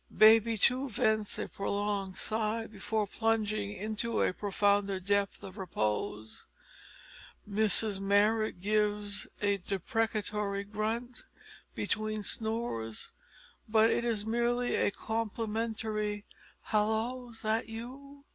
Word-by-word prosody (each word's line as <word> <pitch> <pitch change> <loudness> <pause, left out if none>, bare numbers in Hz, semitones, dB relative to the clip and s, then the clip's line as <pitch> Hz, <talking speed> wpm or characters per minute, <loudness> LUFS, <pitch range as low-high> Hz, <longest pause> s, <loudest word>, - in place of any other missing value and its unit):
Baby, 225 +1 +7
too, 260 +5 +3
vents 215 -1 +1
a - - -3
prolonged 200 -1 -2
sigh 220 +1 -1
before 215 0 -2
plunging 215 -1 0
into 215 +3 -1
a - - +2
profounder 200 0 +1
depth 200 +1 0
of 195 +2 -8
repose. 110 - -2 1.0
Mrs 210 -1 +3
Marrot 205 0 +2
gives 210 0 0 0.2
a 200 0 +3
deprecatory 205 0 -1
grunt 220 +4 -3 0.5
between 215 -1 -1
snores, 220 - -2 0.6
but 220 +1 +5
it - - +1
is 225 -3 -1
merely 240 +2 +1
a - - +3
complimentary 220 -1 -2 0.4
"Hallo! 220 +4 0
's 225 - -11
that 220 +1 0
you?" 275 +5 -9
215 Hz, 105 wpm, -31 LUFS, 200-225 Hz, 1.0 s, Baby